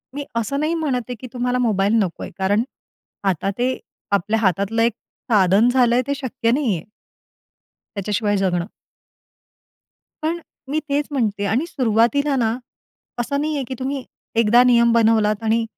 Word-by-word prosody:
मी 285 0 -4
असं 230 +5 -1
नाही 310 +3 0
म्हणत 290 -6 0
आहे, 250 - -3
की 255 - -8
तुम्हाला 250 0 0
मोबाईल 210 -4 +2
नकोय. 180 -3 -5
कारण, 200 +3 +2 0.6
आता 195 0 0
ते 255 +1 0 0.3
आपल्या 210 +3 +1
हातातलं 200 +2 +1
एक 230 0 +3 0.4
साधन 200 +2 +5
झालंय, 245 -1 +3
ते 280 - +1
शक्य 260 -4 -1
नाही 250 -6 +1
आहे 160 - -9 1.1
त्याच्याशिवाय 205 +1 0
जगणं. 180 -3 0 1.6
पण, 330 +2 -1 0.3
मी 295 +3 0
तेच 285 +1 0
म्हणते 215 -7 -1
आणि 225 - 0
सुरुवातीला 265 0 +2
ना, 230 -2 +1 0.6
असं 280 +4 -1
नाहीये, 300 -2 -1
की 260 - -4
तुम्ही 265 0 -3 0.3
एकदा 230 +2 +5
नियम 235 -1 +5
बनवलात 220 -2 +3
आणि 225 +1 +1
235 Hz, 145 wpm, -21 LUFS, 210-265 Hz, 1.6 s, साधन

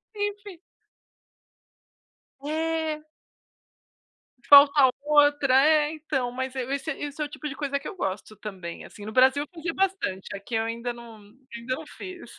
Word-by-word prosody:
Enfim. 410 -2 -4 1.8
É. 315 0 -2 1.4
Falta 280 -1 +8
outra. 290 -2 +4
É, 305 -1 +3
então, 290 -5 -2
mas 260 +1 -4
é 260 - -2
esse 280 +3 -3
esse 290 +1 -5
é - - +1
o - - -6
tipo 300 0 -6
de 275 - -6
coisa 280 -1 -2
que 290 - -7
eu 390 - -8
gosto 200 - -4
também, 185 -5 -8
assim. 205 - -12
No 215 - -6
Brasil 260 +3 +4
eu 295 - -20
fazia 330 0 -4
bastante, 380 - -1
aqui 200 +4 -7
eu 225 0 +1
ainda 235 +2 -3
não 235 -1 -12 0.4
ainda 235 +2 -3
não 310 +2 -8
fiz. 370 +1 -10
285 Hz, 155 wpm, -26 LUFS, 245-315 Hz, 1.8 s, Falta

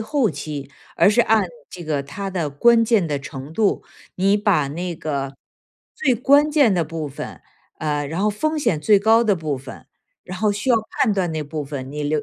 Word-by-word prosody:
后 230 0 +1
期， 145 -3 -6 0.3
而 - - +5
是 215 - +3
按 220 -4 +3 0.2
这 175 -2 -9
个 150 -3 -1
它 195 +8 -6
的 170 -5 -2
关 230 +11 +4
键 220 -6 +2
的 145 -2 -2
程 140 0 -8
度。 210 +3 +1 0.3
你 195 +3 +2
把 190 -9 +2
那 170 +4 -4
个 140 -4 -4 0.6
最 265 - +1
关 285 +5 +4
键 285 -8 +4
的 175 -2 +1
部 160 -1 -5
分， 140 - -8 0.4
呃， 150 -2 -1
然 165 +6 -3
后 210 - +3
风 310 +10 -1
险 180 - 0
最 205 +5 +5
高 220 +3 +4
的 210 -4 +2
部 155 -5 -3
分， 130 0 -11 0.4
然 185 0 -7
后 215 +1 +2
需 205 +5 -1
要 240 - +6 0.3
判 225 - +3
断 190 -4 0
那 155 -1 -3
部 150 +1 -5
分， 135 -2 -7
你 150 0 -4
留 150 0 0
180 Hz, 220 characters per minute, -21 LUFS, 150-215 Hz, 0.6 s, 要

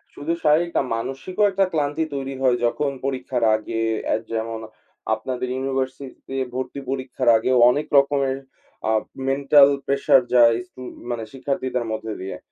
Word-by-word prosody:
শুধু 160 +4 -2
শারীরিক 165 +3 +3
না - - +3
মানসিকও 135 - -3
একটা 195 0 +2
ক্লান্তি 150 +1 0
তৈরি 135 0 -4
হয় 125 -2 +4
যখন 140 +4 0
পরীক্ষার 130 -2 -2
আগে 115 +1 -3 0.3
আ - - +3 0.2
যেমন 115 0 -3 0.6
আপনাদের 125 +3 -4
ইউনিভার্সিটিতে 135 0 -4 0.2
ভর্তি 130 +2 -4
পরীক্ষার 130 -2 -1
আগে 115 +3 -1 0.2
অনেক 145 +4 0
রকমের 140 -1 +2 0.5
আ - - +3 0.4
মেন্টাল 140 +1 +6 0.2
প্রেশার 140 -1 +4
যায় 115 -1 +7
স্টু 130 - -14 0.3
মানে 115 -2 -3
শিক্ষার্থীদের 130 -2 -2
মধ্যে 110 0 -4
দিয়ে। 95 +1 -5
135 Hz, 140 wpm, -22 LUFS, 120-140 Hz, 0.6 s, যায়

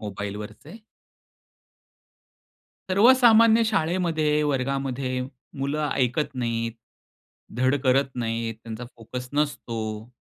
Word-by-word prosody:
मोबाईलवरचे. 105 - -7 2.1
सर्वसामान्य 230 +1 +6
शाळेमध्ये 165 -6 +1
वर्गामध्ये 135 -2 -1 0.5
मुलं 145 +2 -1
ऐकत 130 +3 0
नाहीत, 115 -2 -2 0.8
धड 130 +2 +2
करत 135 +1 +3
नाहीत, 115 -1 -2
त्यांचा 115 +1 -7
फोकस 125 +2 -7
नसतो. 115 -6 -3
135 Hz, 75 wpm, -25 LUFS, 115-155 Hz, 2.1 s, सर्वसामान्य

